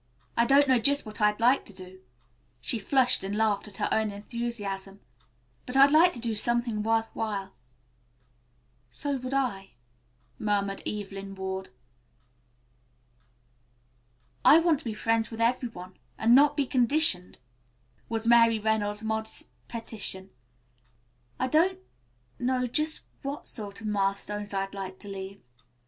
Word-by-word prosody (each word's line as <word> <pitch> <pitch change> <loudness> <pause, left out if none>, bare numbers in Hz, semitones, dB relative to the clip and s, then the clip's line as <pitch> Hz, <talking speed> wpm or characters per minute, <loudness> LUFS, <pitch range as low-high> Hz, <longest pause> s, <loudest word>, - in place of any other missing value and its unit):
I 235 0 +3
don't 280 +2 +5
know 260 -2 +4
just 285 +4 +2
what 215 +1 -8
I'd 210 0 +3
like 245 +4 +4
to 205 - -10
do," 185 0 -11 0.6
she 235 - 0
flushed 255 +3 +2
and 195 +1 -3
laughed 215 -2 +1
at 200 -2 -10
her - - 0
own 220 -1 +1
enthusiasm, 205 -2 -5 0.7
"but 250 +2 +1
I'd 275 +1 +7
like 330 +4 +6
to 240 - -7
do 230 -1 -2
something 235 0 0
worth 225 +1 0
while." 200 -3 -3 1.4
"So 280 - -3
would 255 +1 -4
I," 200 - -2 0.6
murmured 200 -2 -1
Evelyn 195 -1 -6
Ward. 190 0 -5 2.7
"I 305 - +8
want 330 -3 +2
to - - -5
be 220 -2 -3
friends 225 0 0
with 225 - -8
every 245 +1 +1
one, 185 -3 -11 0.2
and 230 +2 +4
not 290 +3 +6
be 285 - +2
conditioned," 250 - +2 0.7
was 225 0 -2
Mary 230 -1 +6
Reynolds' 210 -1 -1
modest 220 0 -4 0.2
petition. 210 -5 -4 1.1
"I 255 - +1
don't 340 +7 +3 0.6
know 250 0 0
just 305 +6 0 0.2
what 280 +2 -5
sort 205 -2 -7
of - - -8
milestones 205 0 -2
I'd 195 0 -3
like 190 -1 -6
to 205 - -12
leave. 195 0 -8
220 Hz, 140 wpm, -28 LUFS, 200-250 Hz, 2.7 s, I